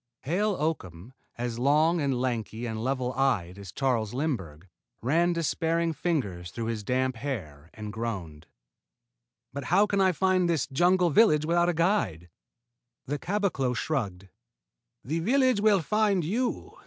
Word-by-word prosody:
Hale 195 +8 0
Oakham, 120 - -4 0.2
as 120 -1 -3
long 155 +6 +3
and 135 -3 0
lanky 120 -2 -2
and 110 -1 -4
level 130 -1 -1
eyed 100 -9 0
as 100 -3 -9
Charles 120 -5 -1
Lindbergh, 95 - -3 0.4
ran 165 +7 +2
despairing 165 0 0
fingers 105 - -2
through 115 +4 -5
his 105 -2 -6
damp 130 +2 0
hair 85 - -6
and 105 -1 -7
groaned. 95 -9 -5 1.1
"But 140 -1 -5
how 195 +8 +4
can 200 -1 0
I 190 -1 +4
find 185 0 +2
this 160 -6 +1
jungle 175 +6 +2
village 155 -5 +4
without 175 +2 +2
a - - +1
guide?" 155 - 0 0.8
The 145 +2 -3
caboclo 180 -11 -1
shrugged. 100 -11 -3 0.7
"The 155 +6 -2
village 255 +3 +2
will 205 -5 +4
find 210 -2 +2
you. 240 +9 -2
140 Hz, 140 wpm, -27 LUFS, 110-175 Hz, 1.1 s, how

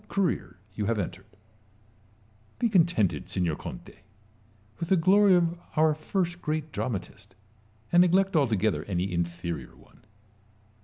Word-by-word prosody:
career 185 - -1 0.2
you 105 0 -3
have 115 -1 +1
entered, 95 -1 -5 1.3
Be 235 - +1
contented, 165 - +2
signor 85 -4 0
Conte, - - -9 0.8
with 170 0 -4
the 190 - +4
glory 190 +3 +5
of 170 -1 +1 0.2
our 155 0 +4
first 175 +3 -2
great 155 0 -3
dramatist, 100 -5 -5 0.6
and 175 - +6
neglect 190 +2 +3
altogether 110 - +1
any 90 -1 -2
inferior 85 0 -4
one. - - -22
155 Hz, 120 wpm, -27 LUFS, -, 1.3 s, and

